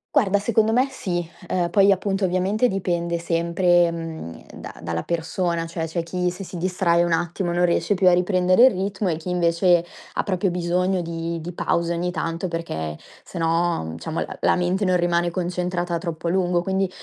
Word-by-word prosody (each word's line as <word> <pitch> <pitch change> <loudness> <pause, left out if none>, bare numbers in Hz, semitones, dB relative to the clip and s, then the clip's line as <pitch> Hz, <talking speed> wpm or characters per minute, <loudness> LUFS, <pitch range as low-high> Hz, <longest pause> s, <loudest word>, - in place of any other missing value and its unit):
Guarda 205 -8 +3
secondo 220 +1 +2
me 250 +4 +3
sì, 175 -9 -3 0.2
uhm, 175 -2 0
poi 195 +2 +5
appunto 195 +1 0
ovviamente 190 +6 +1
dipende 175 -3 -1
sempre, 170 +1 +2
mhmm, 165 - -7
da - - -9
dalla 85 0 -3
persona, 170 0 -1
cioè 165 0 -3
c'è 165 +1 -2
chi 180 +1 -1
se 190 +2 -8
si 185 - -9
distrae 175 -1 +1
un 175 - -1
attimo 175 +2 -1
non 175 +1 +2
riesce 170 +2 +1
più 185 0 +3
a 180 - +7
riprendere 185 +3 +3
il - - +4
ritmo 195 0 -2
e 160 - -1
chi 165 +3 -7
invece 175 0 +3 0.3
ha - - -1
proprio 185 -1 0
bisogno 180 +2 0
di 165 0 -4
di 170 +3 -6
pause 170 0 0
ogni 175 +1 -1
tanto 165 +1 -3
perché 80 - -4 0.3
se - - -9
no, 165 - +1
mhmm, 80 0 -6
diciamo 160 - -4
l - - -5
la - - +3
mente 180 +3 0
non 185 -1 +2
rimane 175 0 +1
concentrata 175 -1 -2
troppo 165 0 -4
a - - +2
lungo. 180 -1 +1
Quindi, 190 0 0
175 Hz, 195 wpm, -23 LUFS, 170-185 Hz, 0.3 s, a